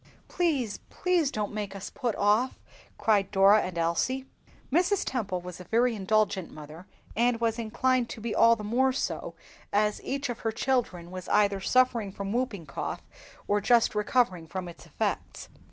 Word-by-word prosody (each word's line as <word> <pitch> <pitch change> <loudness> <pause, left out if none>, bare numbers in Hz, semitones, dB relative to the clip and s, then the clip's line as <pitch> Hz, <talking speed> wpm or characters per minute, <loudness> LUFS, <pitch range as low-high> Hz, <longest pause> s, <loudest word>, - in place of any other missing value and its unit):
"Please, 285 - 0
please, 355 -6 +1
don't 210 -5 -3
make 205 -2 -4
us 195 - -7
put 245 -6 -2
off!" 210 +5 +2 0.4
cried 205 -3 +2
Dora 200 +2 +6
and 180 -2 -5
Elsie. 170 +11 0 0.5
Mrs. 360 +6 +2
Temple 200 -8 -2
was 180 0 -8
a - - -8
very 235 +4 +2
indulgent 205 -2 +1
mother, 155 +4 -11 0.3
and 235 +1 +2
was 230 0 0
inclined 245 +2 +1
to 240 - -7
be 220 0 -3
all 230 0 +6
the 215 - -8
more 255 +5 +2
so 270 - -3 0.4
as 210 +1 +1
every - - -4
one 275 -3 -3
of 235 - -7
her 225 - -1
children 220 -9 -1
was 185 -1 -7
either 200 -2 +3
suffering 240 -3 +2
from 200 +1 -5
whooping 235 -8 -2
cough 140 - -5 0.4
or 205 0 +2
just 235 +2 +4
recovering 210 -5 +1
from 185 +2 -5
its 170 - -12
effects. - - -3
215 Hz, 170 wpm, -28 LUFS, 195-250 Hz, 0.5 s, Dora